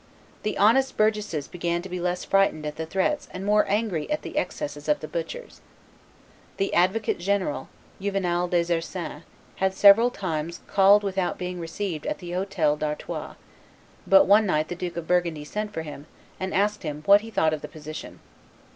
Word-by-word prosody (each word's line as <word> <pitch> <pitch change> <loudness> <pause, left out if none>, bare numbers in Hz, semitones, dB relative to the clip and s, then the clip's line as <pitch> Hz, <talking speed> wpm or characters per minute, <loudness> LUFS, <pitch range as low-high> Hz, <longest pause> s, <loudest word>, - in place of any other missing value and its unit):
The 210 - -2
honest 265 +6 +3
burgesses 210 -9 0
began 175 0 -2
to - - -6
be 180 -1 -5
less 180 +1 -2
frightened 195 -6 +2
at 150 - -4
the 160 0 -5
threats 195 - 0
and 185 +1 -6
more 210 +1 +4
angry 200 -6 -1
at 300 - -1
the - - -7
excesses 215 - -3
of 300 - +3
the - - -7
butchers. - - -6 1.0
The 195 - -1
advocate 190 +5 +2
general, 185 -7 -1 0.3
Juvenal 180 -3 0
des 175 -1 +1
Ursins, 165 -2 -5 0.4
had 190 0 0
several 205 +5 +7
times 170 -6 -4
called 200 +1 +5
without 190 -2 -1
being 180 0 -4
received 165 -1 -4
at - - -2
the 175 -1 -8
Hotel 180 -5 0
d'Artois, 150 0 -4 0.7
but 195 0 +7
one 210 +2 +5
night 155 -3 +1
the 175 - -3
Duke 175 -1 -5
of 165 -1 -5
Burgundy 170 -4 0
sent 210 +6 -4
for 160 -5 -4
him, 150 -1 -9 0.3
and 190 0 -3
asked 205 +2 +1
him 150 -3 -5
what 200 +1 +7
he 225 - -9
thought 160 -7 +2
of 155 - -3
the - - -6
position. 155 0 -9
180 Hz, 180 wpm, -25 LUFS, 165-205 Hz, 1.0 s, several